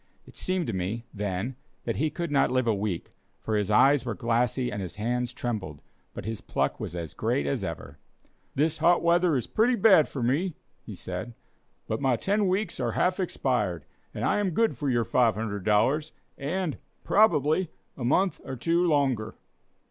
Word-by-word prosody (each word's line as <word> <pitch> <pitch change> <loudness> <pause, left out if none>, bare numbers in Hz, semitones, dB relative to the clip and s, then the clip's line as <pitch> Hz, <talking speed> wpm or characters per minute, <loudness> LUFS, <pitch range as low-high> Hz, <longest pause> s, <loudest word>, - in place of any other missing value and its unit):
It - - -16
seemed 185 -2 -1
to 115 - -3
me, 95 +6 -3
then, 105 +4 -3 0.3
that - - -2
he 155 - +1
could 170 +1 -4
not 140 - +3
live 130 -1 +1
a 115 - +3
week, 100 -3 -3 0.3
for 110 - -2
his 105 -1 0
eyes 135 +5 +5
were 115 -4 -3
glassy 120 +4 0
and 105 -1 -4
his 90 -3 -6
hands 120 +3 -1
trembled, 100 -11 -4 0.4
but - - -6
his 110 -1 -4
pluck - - -1
was 85 - -5
as 85 -4 -5
great 70 - 0
as 70 - -1
ever. 70 +1 -6 0.6
"This 155 +3 +1
hot 175 0 +4
weather 170 -2 +3
is 125 - -2
pretty 240 +3 +2
bad 190 -8 +6
for 130 - -4
me," 150 +9 0 0.3
he - - -9
said, 120 -1 -6 0.5
"but 110 - -2
my 135 -3 +3
ten 200 - +1
weeks 195 +3 -1
are - - -1
half 180 +1 +1
expired, 120 - -1 0.3
and - - -3
I - - +2
am 205 -2 +1
good 225 -1 +2
for 145 - -2
your 120 -2 +1
$500, 110 +5 +1 0.3
and, 160 +3 -2 0.2
probably, 175 -5 +3 0.3
a 130 - -6
month 185 +10 +2
or 130 - -5
two 165 +7 +1
longer." 140 -9 +1
130 Hz, 180 wpm, -27 LUFS, 110-170 Hz, 0.6 s, bad